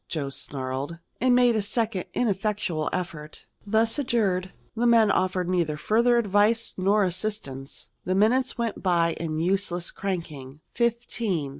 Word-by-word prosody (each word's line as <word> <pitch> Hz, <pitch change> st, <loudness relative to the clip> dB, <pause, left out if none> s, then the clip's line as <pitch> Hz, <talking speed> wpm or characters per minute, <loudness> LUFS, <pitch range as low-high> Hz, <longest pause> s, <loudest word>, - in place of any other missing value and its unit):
Joe 140 Hz, -4 st, -3 dB
snarled, 135 Hz, +3 st, -4 dB, 0.2 s
and 250 Hz, 0 st, +4 dB
made 245 Hz, -2 st, +4 dB
a 215 Hz, -, +1 dB
second 210 Hz, -2 st, -1 dB
ineffectual 200 Hz, -7 st, -1 dB
effort. 165 Hz, -4 st, -5 dB, 0.2 s
Thus 225 Hz, +5 st, +2 dB
adjured, 200 Hz, -9 st, 0 dB, 0.2 s
the 240 Hz, +1 st, +1 dB
men 225 Hz, -3 st, +5 dB
offered 185 Hz, -2 st, 0 dB
neither 170 Hz, -4 st, 0 dB
further 235 Hz, +8 st, +3 dB
advice 215 Hz, +1 st, +2 dB
nor 200 Hz, +3 st, +2 dB
assistance. 180 Hz, -8 st, -4 dB
The 185 Hz, -, -1 dB
minutes 245 Hz, +6 st, +2 dB
went 230 Hz, -3 st, -2 dB
by 170 Hz, -3 st, +2 dB
in 155 Hz, -2 st, -3 dB
useless 175 Hz, 0 st, 0 dB
cranking 155 Hz, -7 st, -5 dB
fifteen. 235 Hz, -, -1 dB
195 Hz, 135 wpm, -26 LUFS, 170-225 Hz, 0.2 s, men